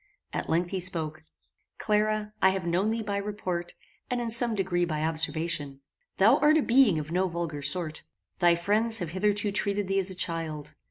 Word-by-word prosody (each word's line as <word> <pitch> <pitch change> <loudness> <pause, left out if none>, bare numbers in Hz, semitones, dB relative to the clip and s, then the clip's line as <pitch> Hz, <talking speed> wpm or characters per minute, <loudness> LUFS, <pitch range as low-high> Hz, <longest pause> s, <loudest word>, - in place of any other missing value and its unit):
At - - -4
length 170 +2 0
he 190 - -2
spoke: 160 -3 -2 0.6
"Clara, 215 0 0
I 190 - +6
have 190 -2 -2
known 180 +5 +1
thee 225 0 -2
by 200 -1 -2
report, 200 -4 -4 0.3
and 245 - -1
in 235 -1 -3
some 235 -1 +5
degree 180 -3 0
by 155 -3 -2
observation. 160 -3 -1 0.4
Thou 225 +8 +5
art 305 +1 +4
a 305 - +2
being 240 -8 +4
of 155 +1 -5
no 185 +2 +1
vulgar 170 -4 -4
sort. 160 0 -1 0.4
Thy 175 -2 +5
friends 215 +6 +1
have 175 -6 -3
hitherto 205 +2 0
treated 200 -1 -1
thee 195 0 +1
as 190 0 -1
a 190 - -5
child. 155 -4 -3
185 Hz, 185 wpm, -27 LUFS, 165-210 Hz, 0.6 s, I